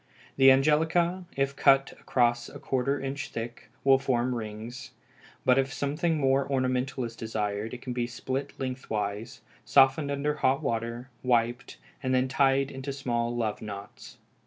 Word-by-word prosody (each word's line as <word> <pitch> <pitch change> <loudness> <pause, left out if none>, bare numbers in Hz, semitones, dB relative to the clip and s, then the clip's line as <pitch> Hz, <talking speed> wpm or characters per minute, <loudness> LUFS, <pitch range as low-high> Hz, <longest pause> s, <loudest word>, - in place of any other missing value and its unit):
The 135 0 +7
angelica, 160 +6 +3
if 135 0 0
cut 135 -1 +4
across 120 -1 +1
a - - -10
quarter 135 +2 -1
inch 135 +1 -4
thick, 115 +1 -7
will 135 -1 +5
form 125 -2 0
rings, 115 +1 -6 0.5
but 130 +1 +5
if 135 0 0
something 150 +4 0
more 135 -1 +2
ornamental 130 0 0
is 115 -1 -5
desired 105 -1 -3
it 125 - -11
can 125 - -4
be 120 -1 -1
split 130 +3 -4
lengthwise, 110 -5 -4 0.2
softened 135 +2 +4
in 140 0 -3
hot 140 -3 +1
water, 115 +3 -3
wiped, 120 0 0 0.2
then 130 -1 +1
tied 135 +1 +2
into 135 +1 -5
small 120 -3 -2
love 110 -3 -2
knots. 100 -2 -9
130 Hz, 145 wpm, -28 LUFS, 120-135 Hz, 0.5 s, The